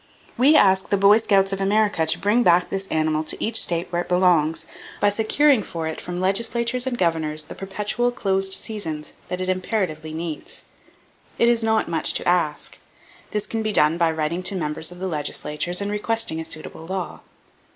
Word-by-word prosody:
We 275 +6 +5
ask 190 -6 +4
the 200 - +2
Boy 200 +3 +6
Scouts 195 -3 +2
of 195 - -3
America 200 -4 +1
to - - +3
bring 210 +5 +2
back 175 -4 +3
this 195 0 -2
animal 155 -1 0
to - - -5
each 225 0 +3
state 170 0 0
where 175 0 0
it - - -9
belongs, 165 -3 +2 0.3
by 205 - +3
securing 240 +5 +3
for 165 -4 -5
it 160 - -4
from 175 0 -5
legislatures 235 +6 0
and 245 -2 -2
governors 160 -4 0
the 155 - -10
perpetual 210 +5 -1
closed 195 -4 0
seasons 165 -9 -3
that 180 0 -4
it 185 - -2
imperatively 185 -5 -2
needs. 160 -2 -6 0.7
It 235 - +3
is 235 -1 +2
not 220 0 +1
much 165 - +1
to - - -2
ask. 170 -4 0 0.5
This 210 0 -2
can 225 - -3
be 215 0 -1
done 160 -3 +3
by 170 -1 +3
writing 160 +2 -2
to 185 +2 -1
members 155 -1 -1
of 180 - -10
the 190 +1 -4
legislatures 150 +2 -2
and 200 0 -2
requesting 210 -5 0
a 160 - -5
suitable 160 0 -7
law. 190 -1 -4
185 Hz, 190 wpm, -22 LUFS, 160-210 Hz, 0.7 s, Boy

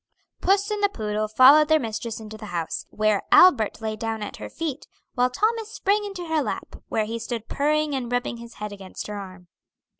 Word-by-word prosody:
Puss 400 +2 +2
and 420 -1 -2
the 405 - +4
poodle 215 - -2
followed 270 +7 +7
their 315 +1 +5
mistress 225 -2 -4
into 220 0 -9
the 215 0 -9
house, 170 -4 -4
where 215 -1 +1
Albert 240 - +6
lay 220 -1 -2
down 225 0 -3
at 205 - -7
her - - -7
feet, 310 -4 -5 0.3
while 250 0 +2
Thomas 435 - 0
sprang 415 -1 0
into 390 -3 -6
her 320 -1 +1
lap, - - -5
where 215 - 0
he 230 +2 -4
stood 230 -1 -5
purring 300 +1 0
and 250 -3 -3
rubbing 245 -1 -1
his 235 0 -11
head 210 0 -6
against 195 -2 -8
her 210 -1 -5
arm. 185 -2 -10
235 Hz, 205 wpm, -24 LUFS, 215-315 Hz, 0.3 s, followed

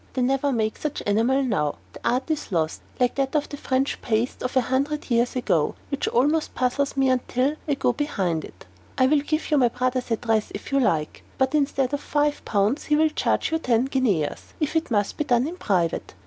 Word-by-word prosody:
They 255 - 0
never 270 +2 +1
make 220 -3 -1
such 300 -2 -3
enamel 230 +7 +2
now. 150 - 0 0.2
The - - -10
art 255 +6 0
is 305 -7 -3
lost, 160 -3 -1 0.2
like 250 -1 +2
that 275 +1 -1
of 295 - +1
the 290 - -5
French 270 -1 -1
paste 230 +2 -1
of 255 +1 -1
a - - +6
hundred 275 +4 -1
years 235 +2 +2
ago, 170 -11 +1 0.2
which 280 - -1
almost 295 +6 +1
puzzles 265 +3 0
even 275 - -3
me 265 - +4
until 255 +3 0
I 290 - +1
go 245 - +1
behind 190 - -1
it. 90 - -12 0.3
I 260 - +5
will 295 +3 +4
give 310 +2 -2
you 300 - +4
my 250 - +5
brother's 250 +1 -1
address 225 -1 0
if 200 - -8
you 275 - +3
like; 160 - 0 0.2
but 265 +1 +1
instead 275 -3 +1
of 285 - -1
five 295 0 0
pounds, 210 +7 +1
he 300 - +2
will 315 +1 +4
charge 310 - 0
you 320 - +1
ten 245 -4 +2
guineas 230 - -1
if 305 0 -1
it 320 0 +1
must 205 -4 0
be - - +1
done 245 -1 +2
in 345 +3 -6
private. 180 - -1
260 Hz, 220 wpm, -24 LUFS, 225-285 Hz, 0.3 s, a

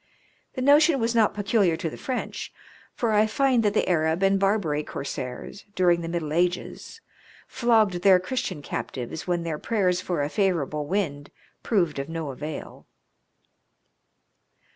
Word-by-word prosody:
The 255 - -2
notion 290 +1 +5
was 230 0 0
not 220 -3 +3
peculiar 200 -4 +2
to 165 - -3
the 155 - -5
French, 260 -2 -4 0.4
for 230 -2 0
I 215 0 +4
find 255 +2 +2
that 210 -1 +1
the - - +2
Arab 160 +1 +1
and 195 0 +3
Barbary 195 -7 +1
corsairs, 130 +8 -6
during 175 -2 +3
the 165 - -5
middle 165 -3 -3
ages, 180 - -2 0.5
flogged 220 -7 +2
their 190 -1 +6
Christian 185 - -4
captives 130 +4 -5
when 175 -1 0
their 160 -2 -3
prayers 185 -5 0
for 175 -6 -2
a - - 0
favourable 155 -7 0
wind 150 -7 -2 0.3
proved 175 -10 0
of 140 +2 -5
no 165 -3 -4
avail. 150 +3 -8
180 Hz, 145 wpm, -25 LUFS, 160-215 Hz, 0.5 s, their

